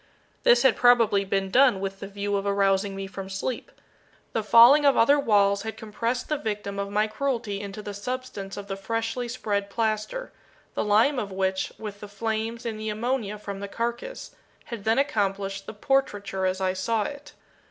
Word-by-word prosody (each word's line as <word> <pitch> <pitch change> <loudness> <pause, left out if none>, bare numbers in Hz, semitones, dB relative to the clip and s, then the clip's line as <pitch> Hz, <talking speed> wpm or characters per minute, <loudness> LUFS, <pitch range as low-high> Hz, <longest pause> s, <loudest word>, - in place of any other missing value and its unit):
This 485 - +5
had 265 -3 +5
probably 230 -5 +4
been 195 0 -1
done 255 -4 +5
with 195 0 -4
the 200 - -6
view 200 0 -3
of 200 0 -1
arousing 195 0 +2
me 195 0 -4
from 195 0 -7
sleep. 195 +6 -4 0.6
The 225 - +1
falling 235 +7 +7
of 280 -1 +4
other 280 +5 +5
walls 200 -5 +3
had 220 +1 -6
compressed 230 +3 -3
the 300 -2 -1
victim 205 -2 -4
of 200 0 -2
my 210 +1 +2
cruelty 220 -3 -2
into 200 +1 -7
the 205 - -6
substance 205 -2 -5
of 200 - -6
the 195 - -3
freshly 225 +4 -3
spread 205 -4 -2
plaster; 220 - -2 0.4
the - - -1
lime 225 +7 +3
of 200 -4 -4
which, 190 0 -1
with 210 -2 -7
the 210 - -8
flames 225 +3 -3
and 220 -2 -3
the 215 0 -3
ammonia 215 -1 -2
from 200 -1 -7
the 200 - -5
carcass, 235 - -4 0.3
had 230 -4 -7
then 225 +1 +3
accomplished 195 -7 -1
the - - -6
portraiture 205 -6 0
as 185 +1 -1
I 185 -1 +1
saw 210 +4 0
it. 285 +5 -8
210 Hz, 185 wpm, -26 LUFS, 200-235 Hz, 0.6 s, falling